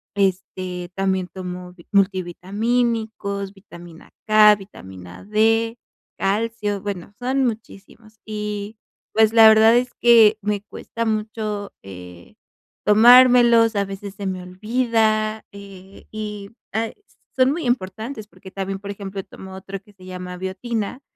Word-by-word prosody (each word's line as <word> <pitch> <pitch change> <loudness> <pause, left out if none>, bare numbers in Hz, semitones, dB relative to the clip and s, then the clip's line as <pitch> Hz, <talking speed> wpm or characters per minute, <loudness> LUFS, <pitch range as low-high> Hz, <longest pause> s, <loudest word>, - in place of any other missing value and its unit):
este 185 -2 -2
también 190 -1 0
tomo 180 -1 -8 0.2
multivitamínicos, 200 +2 -1
vitamina 175 -4 -14 0.2
K, 215 0 +7
vitamina 95 - -12
D, 225 +2 +1 0.4
calcio, 210 0 -1
bueno, 200 -3 -6
son 260 +2 0
muchísimos. 215 -1 -7
Y, 210 0 -5 0.4
pues, 220 0 +4
la 225 -1 +8
verdad 220 +1 +6
es 250 0 -1
que 225 -3 +6
me 210 0 -2
cuesta 230 +2 -6
mucho, 215 -2 -3
eh, 90 -2 -12 0.5
tomármelos, 235 +1 +6
a 200 - +1
veces 195 0 -8
se 200 -1 -7
me 185 -1 -4
olvida, 215 +2 0
eh, 195 -1 -13
y, 210 -1 -6 0.2
ah, 225 +1 -1 0.4
son 260 +1 +3
muy 325 -2 -3
importantes, 220 +1 -3
porque 190 -2 -15
también, 195 0 -4
por 200 0 -7
ejemplo, 195 -1 -7
tomo 190 0 -12
otro 195 0 -8
que 205 - -21
se 185 -1 -17
llama 180 -1 -7
biotina, 210 +6 -4
205 Hz, 125 wpm, -21 LUFS, 190-225 Hz, 0.5 s, la